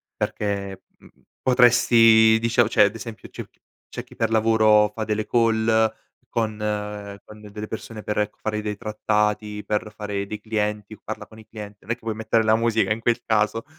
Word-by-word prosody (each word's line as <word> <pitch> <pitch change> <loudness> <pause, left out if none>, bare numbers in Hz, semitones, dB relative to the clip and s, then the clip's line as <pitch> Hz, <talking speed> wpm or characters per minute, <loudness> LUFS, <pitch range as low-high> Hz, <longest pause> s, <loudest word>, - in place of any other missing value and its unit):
perché, 100 -2 -3
mhmm, - - -19 0.3
potresti 115 -3 +5
dicia 115 +1 +2
cioè 105 - +4
ad 100 - -2
esempio 115 -1 -9
c'è - - -8
chi - - -39 0.3
c'é - - -7
chi - - -18
per 115 0 0
lavoro 110 -1 +4
fa 110 - -4
delle 110 0 -2
call 115 -2 +2 0.6
con 110 -2 -2 0.7
con 105 0 -14
delle 105 0 -8
persone 110 -1 -8
per, 105 - -2
ecco, 105 - -2
fare 105 -1 -2
dei 105 -1 -4
trattati, 105 -1 -1
per 105 0 -2
fare 100 -2 -4
dei 105 +1 -6
clienti 105 -1 -3
o - - -14
parla 110 - -6
con 110 - -15
i 110 - -15
clienti. 105 -2 -10
Non 110 - -6
è - - +3
che 120 - -30
puoi 110 -1 -4
mettere 110 +1 +1
la 110 0 +4
musica 115 -3 +1
in 110 - 0
quel 120 0 +1
caso, 110 +1 +1
110 Hz, 190 wpm, -23 LUFS, 105-115 Hz, 0.7 s, potresti